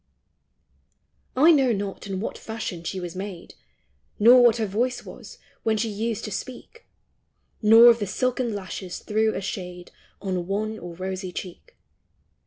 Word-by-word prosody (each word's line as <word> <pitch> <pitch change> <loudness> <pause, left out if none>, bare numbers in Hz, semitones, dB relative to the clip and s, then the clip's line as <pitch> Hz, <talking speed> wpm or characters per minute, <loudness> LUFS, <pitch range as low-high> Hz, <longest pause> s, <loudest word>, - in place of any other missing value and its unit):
I 305 +6 +6
know 270 -6 +4
not 200 -1 -4
in 190 -1 -3
what 215 - -4
fashion 220 -6 -6
she 185 +3 -4
was 175 -1 -6
made, 190 -2 -7 0.6
Nor 245 +4 +7
what 240 -1 +5
her 225 - 0
voice 240 +5 -1
was, - - -11 0.2
when 220 -1 +1
she 225 +1 -1
used 215 +1 -3
to 215 - -6
speak, 260 - -8 0.7
Nor 225 +2 +9
if 235 - 0
the 205 - -2
silken 250 +2 -1
lashes 185 -2 -6
threw 220 +1 0
a - - -3
shade 180 -2 -6 0.3
On 185 -3 -3
wan 215 +2 -2
or 175 -1 -8
rosy 185 +1 -5
cheek. 185 - -9
210 Hz, 155 wpm, -25 LUFS, 185-230 Hz, 0.7 s, Nor